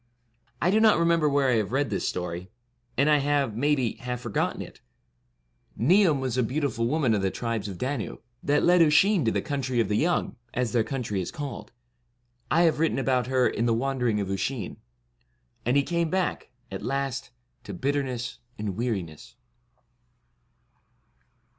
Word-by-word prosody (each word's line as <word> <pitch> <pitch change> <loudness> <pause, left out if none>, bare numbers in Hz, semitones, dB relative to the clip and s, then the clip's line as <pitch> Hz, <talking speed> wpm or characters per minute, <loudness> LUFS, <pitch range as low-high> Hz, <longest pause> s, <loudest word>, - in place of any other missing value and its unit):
I 180 - +2
do 215 - +4
not 220 -1 +5
remember 170 -2 +3
where 140 -2 +2
I 120 - +3
have 105 -2 -1
read 135 -2 0
this 100 - -1
story, 90 +1 -4 0.5
and 140 +3 +3
I 150 -1 +5
have, 140 -5 +1
maybe, 130 -2 +1
half 125 0 -5
forgotten 120 -4 -1
it, - - -9 1.0
Niam 165 - +4
was 130 -1 -1
a - - +5
beautiful 125 -1 -1
woman 135 -4 +2
of 105 - +1
the 95 - +1
Tribes 115 -1 -3
of 95 -3 -6
Danu, 130 -1 -3 0.2
that 145 +1 +2
led 180 0 +5
Oisin 170 +4 +5
to - - +3
the - - -1
Country 130 -4 -2
of 115 - +1
the 105 - +1
Young, 170 -3 0 0.2
as 125 -3 0
their 115 -1 +2
country 115 -7 -3
is 90 - -4
called; 130 -7 -6 0.8
I 170 +3 +4
have 160 -3 +3
written 165 -3 +1
about 130 -2 +1
her 130 -1 +3
in 115 +2 -1
'The 115 - +3
Wandering 125 -3 0
of 100 -1 -2
Usheen; 100 +2 -3 0.4
' - - -42
and 125 +3 +3
he 140 - +4
came 170 +1 0
back, 185 +2 -1 0.2
at 95 - -5
last, 135 -1 -2 0.4
to - - -6
bitterness 130 -3 -2 0.2
and 105 -3 -3
weariness. 95 -9 -4
130 Hz, 170 wpm, -26 LUFS, 115-145 Hz, 1.0 s, not